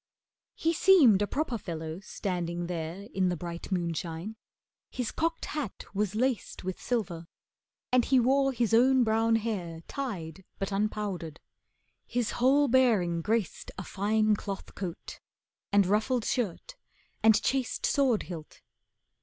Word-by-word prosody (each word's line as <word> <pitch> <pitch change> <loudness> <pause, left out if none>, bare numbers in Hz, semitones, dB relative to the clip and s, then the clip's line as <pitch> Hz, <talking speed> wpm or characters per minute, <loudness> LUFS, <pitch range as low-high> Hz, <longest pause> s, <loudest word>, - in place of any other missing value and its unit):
He 330 +1 +1
seemed 300 - +6
a 205 - +1
proper 265 -4 -2
fellow 160 -2 -5
standing 175 -3 -3
there 170 +3 -5
In 185 -1 +2
the 175 - -1
bright 170 +3 -7
moonshine. 170 +2 -3 0.5
His 250 -3 -3
cocked 330 +1 -1
hat 295 -10 -5
was 210 0 -1
laced 245 -3 -1
With 185 0 -4
silver, 175 -9 -2 0.6
and 250 -1 +4
he 265 -1 +4
wore 270 +3 +3
his 235 -3 0
own 255 +2 +5
brown 225 0 +2
hair 190 -8 -3
Tied, 190 - -5
but 195 0 -3
unpowdered. 195 -6 -2 0.7
His 240 -3 -1
whole 280 +3 +5
bearing 220 -10 +3
graced 215 0 -1
A 190 - -4
fine 215 +3 +1
cloth 195 -1 -6
coat, 180 -3 -6 0.5
and 200 -1 +5
ruffled 215 +5 +1
shirt, 235 - -2 0.5
and 220 -1 +6
chased 260 0 -1
Sword 260 -6 +2
hilt. 165 -4 -9
210 Hz, 135 wpm, -29 LUFS, 175-245 Hz, 0.7 s, seemed